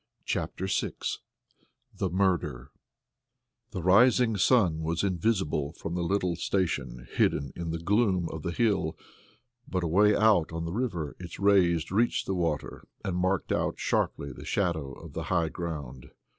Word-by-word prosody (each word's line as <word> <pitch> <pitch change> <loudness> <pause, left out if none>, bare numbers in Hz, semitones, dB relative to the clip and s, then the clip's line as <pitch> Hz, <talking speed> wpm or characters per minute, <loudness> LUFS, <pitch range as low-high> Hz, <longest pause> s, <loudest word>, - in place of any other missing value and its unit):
CHAPTER 95 - -2
VI 95 - -1 1.0
The 95 - -1
Murder 90 -9 0 1.0
The 90 - -5
rising 115 +5 +5
sun 100 -5 +3
was 80 +2 -1
invisible 90 -6 0
from 85 0 -6
the 90 - -1
little 90 0 0
station 80 -10 -2
hidden 70 -1 0
in 85 -1 -4
the 80 - -2
gloom 95 0 +1
of 80 - -6
the 85 - -3
hill, 100 -4 0 0.7
but 90 -1 -2
away 100 +6 +4
out 105 -7 +4
on 85 0 -4
the 85 - -4
river 95 - -2
its 85 -1 -8
rays 90 -5 +3
reached 115 +5 +1
the 95 - -1
water 85 -5 -2 0.2
and 95 - -1
marked 95 0 0
out - - 0
sharply 70 - -1
the - - -10
shadow 85 -8 -1
of - - -11
the - - -4
high 85 -2 +2
ground. 75 -8 -6
90 Hz, 150 wpm, -28 LUFS, 80-100 Hz, 1.0 s, rising